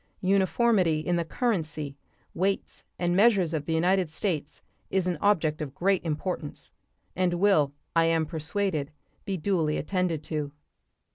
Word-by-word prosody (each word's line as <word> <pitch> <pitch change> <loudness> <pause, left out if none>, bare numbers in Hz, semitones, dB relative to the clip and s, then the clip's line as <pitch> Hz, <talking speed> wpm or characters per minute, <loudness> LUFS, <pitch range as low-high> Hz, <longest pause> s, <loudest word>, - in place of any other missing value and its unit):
Uniformity 190 -3 +3
in 175 +2 0
the 170 - +1
currency, 160 - -2 0.4
weights, 195 +3 -1
and 175 0 0
measures 195 -5 +4
of 150 -2 -2
the 165 - 0
United 180 +1 +2
States 155 -1 -3 0.3
is 190 -1 +1
an 180 -1 0
object 160 -7 +2
of 140 -2 -5
great 195 +1 +1
importance, 155 -1 -4 0.4
and 180 -1 +1
will, 175 -7 +3 0.2
I 165 0 +5
am 165 -1 +2
persuaded, 160 -1 -2 0.4
be 195 -2 -2
duly 165 -3 0
attended 175 -3 -1
to. 150 -3 -3
175 Hz, 140 wpm, -27 LUFS, 155-190 Hz, 0.4 s, I